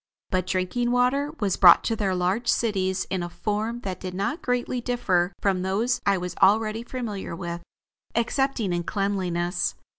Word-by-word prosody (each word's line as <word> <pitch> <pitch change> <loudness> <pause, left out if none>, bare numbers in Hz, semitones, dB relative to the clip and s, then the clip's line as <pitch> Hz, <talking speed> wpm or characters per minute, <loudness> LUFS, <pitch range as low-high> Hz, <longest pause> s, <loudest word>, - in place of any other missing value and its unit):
But 185 -1 0
drinking 185 +7 0
water 250 +4 +2
was 200 -4 0
brought 175 -3 +8
to 225 - 0
their 195 -4 0
large 185 +7 0
cities 190 -4 +1
in 190 -2 0
a 175 - -4
form 215 +5 -3
that 185 -4 -5
did 185 -1 -6
not 200 - -2
greatly 245 0 -1
differ 190 -8 +1
from 190 -2 +1
those 205 +7 0
I 200 -1 +4
was 180 -1 -5
already 215 +3 +4
familiar 235 -7 -5
with, 170 -1 -5 0.5
excepting 235 -3 0
in 175 - 0
cleanliness. 180 -2 -1
200 Hz, 160 wpm, -25 LUFS, 185-235 Hz, 0.5 s, brought